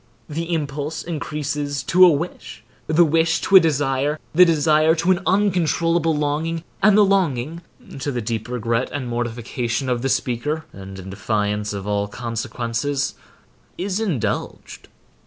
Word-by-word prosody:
The 165 +3 -4
impulse 150 -1 -3
increases 145 -3 -3
to 180 +8 +5
a - - +8
wish, 150 -7 -4 0.2
the 160 +2 +4
wish 165 +1 +2
to 195 - +2
a - - +11
desire, 145 -2 0 0.2
the 180 +3 +7
desire 155 0 +3
to 170 +3 +1
an 180 - +2
uncontrollable 170 -4 +2
longing, 155 +3 -1 0.2
and 210 +1 +5
the 210 - +6
longing 165 -5 0 0.4
(to 140 +2 -2
the 125 - -2
deep 115 0 -4
regret 120 0 -1
and 140 -3 -4
mortification 120 +2 -3
of 120 -1 0
the 135 - -1
speaker, 145 +7 -1
and 95 0 -9
in 95 0 -8
defiance 105 +1 -1
of 100 -1 -5
all 100 0 -1
consequences) 120 +5 -3 0.6
is 190 +2 -2
indulged. 180 - -3
145 Hz, 145 wpm, -21 LUFS, 120-165 Hz, 0.6 s, a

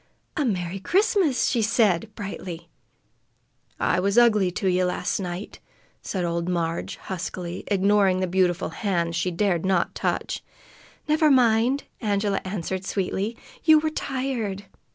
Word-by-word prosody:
"A 300 - +1
Merry 190 -6 -2
Christmas!" 370 - +2
she 240 - +1
said 215 -3 +2
brightly. 180 -5 -7 1.1
"I - - +2
was 200 +4 0
ugly 215 -6 +5
to 180 +2 -2
ye 185 0 +2
last 180 +3 -1
night," 180 +1 -5 0.4
said 185 -3 -2
old 170 +1 -1
Marg 170 -2 -2
huskily, 180 -1 -6
ignoring 200 -1 +3
the 185 - +1
beautiful 180 -1 +1
hand 170 -1 -1
she 170 +2 0
dared 175 -1 0
not 185 -2 +1
touch. - - -2 0.6
"Never 305 0 +4
mind!" 250 +1 +3 0.2
Angela 205 -2 0
answered 185 -1 -3
sweetly. 195 +4 -2 0.3
"You 315 -1 +7
were 310 0 0
tired." 255 -9 -3
195 Hz, 130 wpm, -25 LUFS, 180-225 Hz, 1.1 s, You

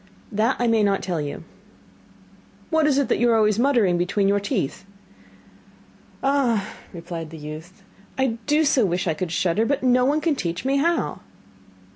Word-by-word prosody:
'That 220 +5 +1
I 245 - 0
may 225 -2 +3
not 200 -1 +1
tell 175 -4 -2
you.' 145 +2 -6 1.3
'What 320 -1 +3
is 280 -2 +2
it 280 - +2
that - - +1
you 240 - +3
are 230 - +4
always 215 -1 +2
muttering 235 -10 +3
between 195 +3 +1
your 200 +1 +2
teeth?' 195 - -3 1.4
'Ah,' 255 -7 +1 0.2
replied 165 -2 -7
the 160 - -10
youth, 160 +6 -10 0.3
'I 255 -4 0
do 300 +2 +3
so 275 -3 +3
wish 180 -2 0
I 165 - +2
could 165 +2 -4
shudder, 175 +4 +1
but 280 +4 -1
no 250 0 +4
one 285 +4 +2
can 315 -1 0
teach 175 -2 -4
me 275 +1 +2
how. 335 +4 0
215 Hz, 175 wpm, -23 LUFS, 175-270 Hz, 1.4 s, are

